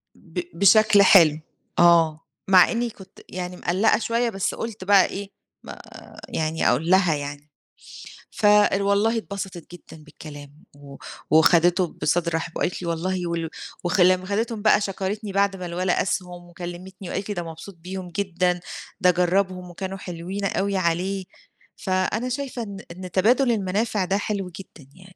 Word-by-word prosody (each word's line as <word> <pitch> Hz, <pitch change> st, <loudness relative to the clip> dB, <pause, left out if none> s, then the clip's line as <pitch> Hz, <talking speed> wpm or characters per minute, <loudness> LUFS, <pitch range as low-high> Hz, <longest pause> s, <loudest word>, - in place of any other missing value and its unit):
ب 175 Hz, +1 st, -8 dB, 0.2 s
بشكل 210 Hz, +1 st, +6 dB
حلو، 160 Hz, -6 st, +6 dB, 0.4 s
آه. 165 Hz, -2 st, +4 dB, 0.2 s
مع 185 Hz, -2 st, +6 dB
إني 235 Hz, 0 st, -1 dB
كنت 195 Hz, -3 st, -15 dB
يعني 180 Hz, 0 st, -6 dB
مقلّقة 190 Hz, +7 st, +2 dB
شوية، 235 Hz, +1 st, 0 dB
بس 195 Hz, -4 st, -2 dB
قُلت 225 Hz, -4 st, -6 dB
بَقى 195 Hz, 0 st, +5 dB
إيه 200 Hz, 0 st, -6 dB, 0.3 s
ما -, -, -10 dB, 0.5 s
يعني 160 Hz, 0 st, 0 dB
أقول 150 Hz, +7 st, 0 dB
لها 180 Hz, -4 st, +4 dB
يعني. 145 Hz, +1 st, -7 dB, 0.8 s
فوالله 205 Hz, +1 st, +3 dB
اتبسطت 195 Hz, -5 st, -6 dB
جدًا 160 Hz, -3 st, -13 dB
بالكلام، 145 Hz, -1 st, -12 dB
و 140 Hz, -1 st, -13 dB, 0.4 s
وخدتِه 175 Hz, +3 st, +4 dB
بصدر 170 Hz, +2 st, 0 dB
رحِب 165 Hz, +1 st, -4 dB
وقالت 180 Hz, -, -2 dB
لي: 170 Hz, -, -5 dB
"والله 175 Hz, +2 st, -2 dB
ول"، 165 Hz, -1 st, -3 dB, 0.3 s
وخ 180 Hz, +2 st, 0 dB
لمّا 185 Hz, +1 st, +4 dB
خدتِهم 220 Hz, +3 st, -2 dB
بَقى 215 Hz, 0 st, +4 dB
شكرتني 200 Hz, +1 st, -3 dB
بعد 200 Hz, 0 st, +1 dB
ما 185 Hz, -1 st, -7 dB
الولد 180 Hz, +2 st, -1 dB
قاسهم، 180 Hz, -2 st, -2 dB
وكلمتني 175 Hz, +2 st, -9 dB
وقالت 195 Hz, +2 st, -4 dB
لي: 205 Hz, -, -2 dB
"ده 175 Hz, -, -3 dB
مبسوط 165 Hz, +4 st, -10 dB
بيهم 180 Hz, +1 st, -7 dB
جدًا، 180 Hz, -1 st, -1 dB, 0.4 s
ده 180 Hz, -, +6 dB
جرّبهم 180 Hz, +1 st, 0 dB
وكانوا 190 Hz, +2 st, -6 dB
حلوين 185 Hz, +2 st, -6 dB
أوي 195 Hz, 0 st, -1 dB
عليه"، 185 Hz, +2 st, -1 dB, 0.5 s
فأنا 195 Hz, +6 st, -1 dB
شايفة 255 Hz, -2 st, -4 dB
إن 200 Hz, -2 st, -8 dB
إن 180 Hz, +1 st, -9 dB
تبادل 240 Hz, +7 st, +3 dB
المنافع 205 Hz, 0 st, -1 dB
ده 195 Hz, +2 st, 0 dB
حلو 200 Hz, -2 st, -3 dB
جدًا 160 Hz, -7 st, -13 dB
يعني. 185 Hz, 0 st, -17 dB
185 Hz, 150 wpm, -23 LUFS, 175-200 Hz, 0.8 s, بشكل